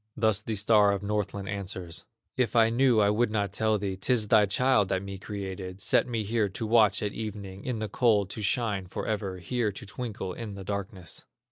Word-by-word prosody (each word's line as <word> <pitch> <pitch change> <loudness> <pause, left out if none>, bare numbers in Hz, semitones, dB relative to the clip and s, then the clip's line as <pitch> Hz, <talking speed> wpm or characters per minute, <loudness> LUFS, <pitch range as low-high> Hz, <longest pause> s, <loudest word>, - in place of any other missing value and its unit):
Thus 110 -3 +2
the 110 0 -3
star 105 0 +4
of 100 0 -3
Northland 100 -1 -2
answers: 95 -4 -5 0.3
"If 125 -3 0
I 115 -1 +5
knew, 125 -1 +4
I 100 -1 +4
would 115 +3 +2
not 105 -3 -1
tell 110 +1 +2
thee; 95 -1 -3
'Tis 110 +2 +1
thy 105 -2 +5
child 105 -1 +3
that 95 0 0
me 100 -1 -7
created, 95 -2 -6
Set - - +3
me 115 -3 -2
here 105 0 0
to 100 +4 -4
watch 110 -3 +4
at 105 - -2
evening, 100 -3 -6
In 125 -3 -2
the 110 0 -3
cold 105 -3 +2
to 110 - -5
shine 105 -3 0
forever, 100 0 -3
Here 110 +4 -1
to 100 - -9
twinkle 105 -4 -5
in 110 -2 -7
the 100 - -7
darkness." 95 -3 -5
105 Hz, 205 wpm, -28 LUFS, 100-110 Hz, 0.3 s, I